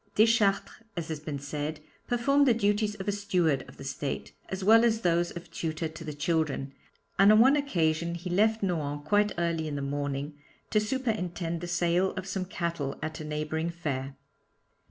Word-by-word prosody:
Deschartres, 215 -2 +3 0.2
as 165 -2 -3
has 155 -2 -3
been 150 -1 -5
said, 145 +2 -4 0.3
performed 275 +4 +3
the 240 - +5
duties 210 -1 +1
of 195 -1 -7
a - - +3
steward 180 -8 +1
of - - -14
the - - -9
estate, 135 +1 -4 0.2
as 190 0 -4
well 225 +3 +7
as 225 -1 +2
those 175 -1 +2
of 170 - -9
tutor 160 0 -2
to 160 +1 -9
the 155 - -5
children, 150 -3 -1 0.5
and 200 +2 +8
on 215 - +7
one 265 +5 +7
occasion 170 - 0
he 175 +2 -6
left 220 +3 +2
Nohant 145 -6 -2
quite 210 0 +3
early 170 -2 0
in 150 - -3
the 140 - -3
morning 145 +1 -3 0.3
to 215 - +4
superintend 205 -8 -2
the 175 - -4
sale 175 +2 +1
of 190 -1 -4
some 190 -1 -3
cattle 170 -6 -3
at 155 -1 -4
a - - -5
neighbouring 155 +2 -2
fair. 140 -5 -4
170 Hz, 185 wpm, -29 LUFS, 155-205 Hz, 0.5 s, and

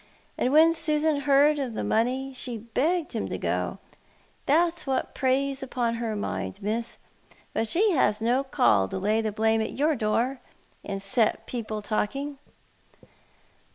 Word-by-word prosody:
And 255 - 0
when 320 +3 +6
Susan 310 -2 +2
heard 285 +1 +4
of 250 -5 -3
the - - -2
money, 255 +4 0
she 250 -2 -5
begged 290 +10 -1
him - - -2
to - - -3
go - - -2 0.3
— - - -34
that's 335 +2 +2
what 265 -1 -1
preys 270 +1 0
uDon 245 -3 -2
her 230 -2 -2
mind. 95 - -4
Miss; 230 +3 -3 0.6
but 225 - 0
she 400 - +2
has 210 - +2
no 245 +4 +1
call 100 - +3
to - - -5
lay 210 +4 +1
the 220 -1 -2
blame 220 +1 +1
at 220 - -3
your 300 +2 +1
door, 240 +3 0 0.4
and 195 -1 -4
set 215 +3 0
people 220 -3 -4
talking." 275 +7 -2
250 Hz, 155 wpm, -26 LUFS, 220-285 Hz, 0.6 s, when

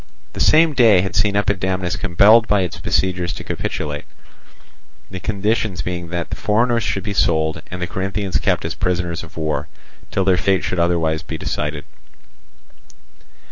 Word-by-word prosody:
The - - -7
same 160 0 +5
day 115 -8 +5
had 95 -2 -4
seen 105 -1 +2
Epidamnus 95 -3 0
compelled 105 +5 +5
by 105 -1 +3
its 90 -3 -4
besiegers 90 -2 0
to - - -7
capitulate; 75 -1 -4 1.1
the 95 - -5
conditions 105 -1 -1
being 90 -1 -4
that 85 -1 -4
the - - -2
foreigners 115 +2 +1
should 95 -3 -2
be 100 0 -3
sold, 80 -4 +1
and 90 - -6
the 90 - -1
Corinthians 95 +1 -2
kept - - 0
as - - -2
prisoners 90 -2 -2
of 80 - -13
war, 80 -1 -2 0.4
till 95 - 0
their 95 -2 +3
fate 95 0 +1
should 90 - -2
be - - +2
otherwise 80 -2 +1
decided. 75 0 -4
95 Hz, 160 wpm, -20 LUFS, 85-100 Hz, 1.1 s, same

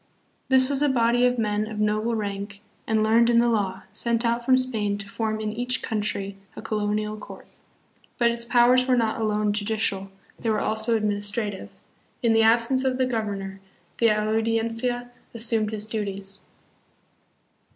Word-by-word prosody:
This 260 -1 +5
was 280 0 +1
a 295 - +3
body 245 -1 +3
of 250 0 0
men 210 -1 0
of 215 -1 -6
noble 215 +2 0
rank 200 -1 -5 0.3
and 220 -1 +2
learned 230 +2 +4
in 235 - +4
the 235 +1 +4
law, 195 -5 -1
sent 235 +2 0
out 235 +1 0
from 255 +1 +4
Spain 220 -6 -1
to 200 -1 -6
form 215 +1 -2
in 215 -1 -2
each 245 +2 -2
country 205 -3 -3 0.2
a - - -7
co 220 -1 -2
lonial 210 +1 -2
court; - - -11 0.7
but 235 -1 +3
its 235 0 -2
powers 245 +1 +4
were 255 -1 +3
not 225 -1 0
alone 210 -1 +1
judicial; 205 -2 -1 0.3
they 230 - -2
were 215 - +2
also 220 +1 0
administrative. 205 -1 -2 0.5
In 230 -1 +4
the 225 - +4
absence 230 +4 +3
of 260 -1 0
the 260 - +2
governor 200 -5 -4 0.4
the 230 - +5
audiencia 225 +3 0 0.2
assumed 225 -2 +2
his 215 -1 -2
duties. 200 -3 -3
220 Hz, 165 wpm, -25 LUFS, 210-235 Hz, 0.7 s, This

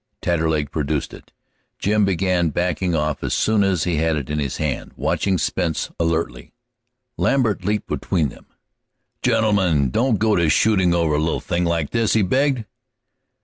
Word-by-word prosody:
Taterleg 80 -4 0
produced 75 -1 -2
it. - - -13 0.5
Jim 105 0 +2
began 90 -2 +1
backing 90 +2 -1
off 75 -2 -1
as - - -1
soon 110 -2 +2
as 95 -4 +1
he 85 -3 0
had 80 +1 +1
it 70 -2 -4
in 75 - -1
his 70 -4 -3
hand, 75 -4 -3
watching 95 -2 0
Spence 85 0 -1
alertly. 80 - -2 0.6
Lambert 110 -8 +1
leaped 105 +2 -1
between 80 -6 -1
them. - - -16 0.7
"Gentlemen, 90 - +2
don't 115 - +2
go 110 +1 +2
to 85 -2 +2
shootin' 95 -1 +3
over 85 -3 +1
a 75 - +2
little 80 +1 0
thing 90 -4 -1
like 85 -3 -1
this!" 115 -2 +1
he 110 - +3
begged. 130 +3 +1
85 Hz, 160 wpm, -21 LUFS, 75-100 Hz, 0.7 s, shootin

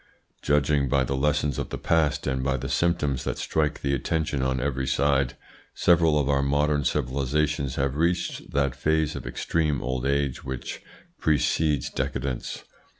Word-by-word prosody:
Judging 75 -1 +2
by 70 +1 +3
the 70 +2 -1
lessons 75 0 +1
of - - -3
the - - -4
past, 80 -3 +1
and 65 -1 -1
by 70 0 +1
the 65 +2 -4
symptoms 70 -1 0
that - - -3
strike 75 -1 -1
the 70 0 +1
attention 75 +1 -1
on 65 0 0
every 65 -1 -1
side, 70 -3 +2 0.4
several 85 -3 +4
of 70 -2 +1
our 70 -1 +2
modern 75 +1 +1
civilisations 70 +1 0
have 70 0 0
reached 85 +3 -1
that 70 -3 +1
phase 80 +2 +1
of - - -6
extreme 75 -4 0
old 65 +1 -3
age 70 -1 0
which 65 -2 -5 0.4
precedes 75 -2 +1
decadence. 65 -1 -3
70 Hz, 155 wpm, -26 LUFS, 65-75 Hz, 0.4 s, several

